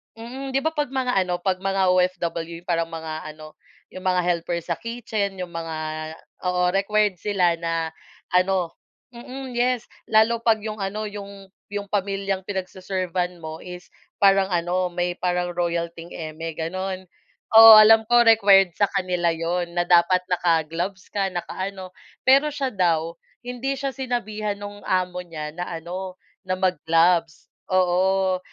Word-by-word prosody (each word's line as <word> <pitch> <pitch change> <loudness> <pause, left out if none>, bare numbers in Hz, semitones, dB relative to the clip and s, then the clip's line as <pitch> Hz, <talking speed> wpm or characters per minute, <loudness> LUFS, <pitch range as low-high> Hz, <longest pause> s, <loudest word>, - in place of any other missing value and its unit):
Mhm, 260 +4 -7
'di 270 - +2
ba, 320 +3 -2
'pag 295 -3 -1
mga 250 -7 +1
ano, 180 -1 -3
'pag 185 0 -2
mga 195 -1 +1
OFW 175 -2 -1
parang 165 -1 0
mga 160 -1 -6
ano, 155 0 -13 0.3
'yong 185 - -11
mga 180 -1 +2
helper 170 0 -1
sa 170 0 -3
kitchen, 215 -3 -4
'yong 180 - -3
mga 165 -1 -5 0.7
oo, 180 0 +1
required 205 0 +2
sila 180 -3 +1
na, 165 -1 -3 0.4
ano 180 -2 +1 0.4
mm, 255 +1 -8
yes, 245 -1 0 0.2
lalo 225 +1 +3
'pag 225 -2 +3
'yong 215 -1 -5
ano, 210 +2 -3
'yong 200 -1 -9 0.2
'yong 205 0 -4
pamilyang 195 -1 -2
pinag-se-servant 185 -2 -3
mo 160 0 -8
is 180 0 -9 0.3
parang 195 -1 +4
ano, 180 +1 0
may 175 0 -2
parang 180 -1 -1
royal 170 -1 0
thing 170 +1 -10
eme, 165 0 -6
gano'n. 185 +2 -4 0.5
Oo, 225 -1 +11
alam 220 +1 +7
ko 240 0 +5
required 195 -5 +6
sa 205 -2 +1
kanila 180 -2 0
'yon 170 +1 -2
na 175 - 0
dapat 180 +1 +4
naka-gloves 175 +2 -1
ka, 195 -2 -2
naka-ano, 185 +1 -6 0.3
pero 280 +3 +5
siya 275 -2 -2
daw, 170 -7 0 0.3
hindi 265 +2 -3
siya 275 -1 -3
sinabihan 215 -5 -3
nong 205 0 -9
amo 180 -1 -1
niya 155 -2 -7
na 175 0 -4
ano, 180 +3 -6 0.3
na 185 - 0
mag-gloves, 165 -2 +1 0.2
oo. 185 0 +2
185 Hz, 145 wpm, -23 LUFS, 175-205 Hz, 0.7 s, Oo